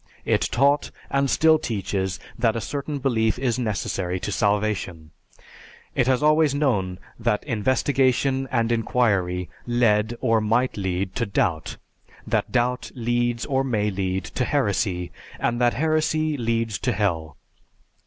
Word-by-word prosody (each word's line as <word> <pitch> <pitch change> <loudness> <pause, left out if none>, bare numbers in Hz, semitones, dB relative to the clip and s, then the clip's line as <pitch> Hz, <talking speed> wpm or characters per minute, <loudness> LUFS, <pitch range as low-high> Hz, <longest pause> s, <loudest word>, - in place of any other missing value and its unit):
It - - +2
taught, 140 +3 +3 0.2
and 140 0 +2
still 160 +2 +4
teaches, 95 - -2 0.2
that 115 -1 +1
a - - -1
certain 140 +7 -4
belief 115 -5 +1
is 125 -2 0
necessary 100 -5 -2
to 105 - -3
salvation. 100 -6 -1 0.8
It 125 - +1
has 130 +1 +2
always 155 -1 +4
known 105 -11 0 0.2
that 110 -2 0
investigation 130 +2 +1
and 115 -2 +1
inquiry 100 -6 +1 0.2
led, 115 -2 +2
or 115 -3 +2
might 115 +4 +1
lead, 95 -1 -2
to 115 - 0
doubt; 85 -5 -1 0.5
that - - -1
doubt 125 0 0
leads, 120 0 0
or 135 -1 +1
may 105 -5 0
lead, 95 -1 -2
to 125 - -2
heresy, 100 -9 0 0.3
and 120 +1 0
that 120 -1 +3
heresy 155 +1 +1
leads 115 -3 -1
to 125 - 0
Hell. 80 -8 -1
115 Hz, 135 wpm, -24 LUFS, 100-130 Hz, 0.8 s, still